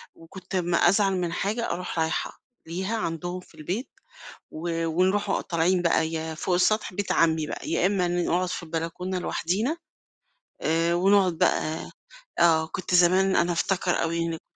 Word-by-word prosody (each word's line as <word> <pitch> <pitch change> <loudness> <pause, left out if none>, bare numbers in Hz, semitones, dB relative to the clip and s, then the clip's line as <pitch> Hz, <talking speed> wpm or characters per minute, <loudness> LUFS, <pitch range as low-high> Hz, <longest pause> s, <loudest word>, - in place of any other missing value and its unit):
وكنت 185 +3 -10
أمّا 175 -2 +1
أزعل 195 +2 +4
من 175 -2 -2
حاجة 220 +6 -1
أروح 180 -1 -4
رايحة 160 0 -2 0.3
ليها، 190 +7 -2
عندهم 175 -1 -3
في 175 - -20
البيت، 180 - -4 0.6
و 165 +1 -3
ونروح 190 +5 +1
أ - - +1
طالعين 175 +1 +1
بقى. 165 -2 +2
يا 160 0 -4
فوق 180 +3 -1
السطح 210 +2 +1
بيت 205 +1 -2
عمي 160 -2 +2
بقى، - - -6
يا 165 +2 +1
إمّا 195 -3 +1
ن 175 0 0
نقعُد 180 +1 0
في 180 - -4
البلكونة 170 +3 -3
لوحدينا. 210 - -1 0.8
آآ، 165 +2 +1
ونقعُد 190 -2 +3
بقى 155 +1 0 0.5
آه، 160 -2 +4
كنت 180 +1 -2
زمان 185 +2 +4
أنا 175 +1 +2
أفتكر 180 +1 0
أوي 165 0 -1
إنّي 165 -1 -2
ك - - -22
175 Hz, 165 wpm, -26 LUFS, 165-190 Hz, 0.8 s, أزعل